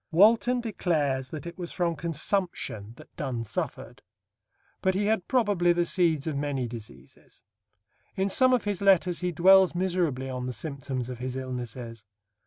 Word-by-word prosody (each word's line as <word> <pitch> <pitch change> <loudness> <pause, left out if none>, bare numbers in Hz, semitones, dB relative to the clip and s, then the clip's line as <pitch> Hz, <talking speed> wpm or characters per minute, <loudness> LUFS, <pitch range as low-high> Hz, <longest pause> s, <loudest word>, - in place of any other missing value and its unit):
Walton 225 +7 +4
declares 150 - -1
that 150 -1 -7
it 170 +1 -8
was 175 -1 -5
from 170 -2 -1
consumption 165 - -2
that - - -16
Donne 120 -3 -3
suffered; - - -5 0.8
but 190 0 +1
he 205 +2 +1
had 215 -3 0
probably 205 -9 +3
the 175 0 +1
seeds 165 -5 +1
of 155 -3 -2
many 140 -3 -2
diseases. 115 -2 -12 0.7
In 190 +1 0
some 255 +6 +4
of 250 -2 +2
his 205 -2 -2
letters 185 -3 +3
he 180 -1 -1
dwells 190 +2 +5
miserably 175 -8 0
on 125 -1 -4
the 125 - -3
symptoms 135 -4 -4
of 125 -2 -7
his 125 0 -4
illnesses. 120 -4 -6
170 Hz, 160 wpm, -27 LUFS, 130-190 Hz, 0.8 s, dwells